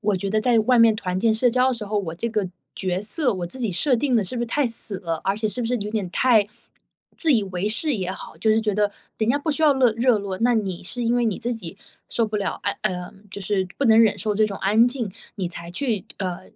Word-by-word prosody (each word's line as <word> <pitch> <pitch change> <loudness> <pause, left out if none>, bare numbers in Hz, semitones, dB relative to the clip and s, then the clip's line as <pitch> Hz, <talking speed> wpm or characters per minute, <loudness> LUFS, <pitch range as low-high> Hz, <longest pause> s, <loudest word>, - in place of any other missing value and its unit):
我 210 -2 0
觉 195 +2 -3
得 215 +1 +1
在 240 0 +3
外 240 +2 +3
面 230 -1 +6
团 185 -4 -3
建 220 +2 +2
社 245 +2 +3
交 250 +2 +2
的 260 - 0
时 230 -3 -6
候， 210 +1 -1
我 170 -5 -4
这 230 +7 -3
个 210 -4 -1 0.3
角 185 0 -2
色， 245 +1 +2
我 180 -2 -4
自 260 - -6
己 230 -6 -2
设 255 - +2
定 255 +2 0
得 225 - +3
是 200 +6 -5
不 240 - -1
是 - - -2
太 290 +5 0
死 225 -3 +4
了？ 165 -4 -3
而 195 +1 0
且 215 0 -1
是 245 - -3
不 235 - -1
是 245 - 0
有 210 +1 -5
点 210 -4 -2
太 230 -5 +3 0.7
自 320 -3 +5
以 230 -5 +3
为 190 +1 -3
是 295 +8 -1
也 185 -4 -3
好， - - -10
就 220 - -1
是 220 +1 +3
觉 215 -2 -1
得 205 -1 +1 0.3
人 220 0 0
家 270 - +3
不 300 +2 -2
需 300 - -2
要 300 -2 +6
乐 260 -3 +3
热 235 0 +3
络， 195 -2 -5
那 240 +1 +2
你 195 -6 -2
是 245 +6 -2
因 235 +1 +1
为 240 - +1
你 220 -4 -1
自 240 - -2
己 195 -5 -9 0.3
受 230 - 0
不 215 0 -3
了， 205 - -3
呃 - - 0
嗯， 180 +2 -4
就 200 - -7
是 195 -1 -1
不 280 - 0
能 225 0 +6
忍 220 -3 +3
受 210 -1 -1
这 215 +1 +3
种 200 -2 -5
安 215 +4 +4
静， 245 -5 -4 0.3
你 185 -4 -2
才 170 0 -8
去， 215 +1 -2
呃， 180 -3 -4
215 Hz, 300 characters per minute, -23 LUFS, 195-240 Hz, 0.7 s, 面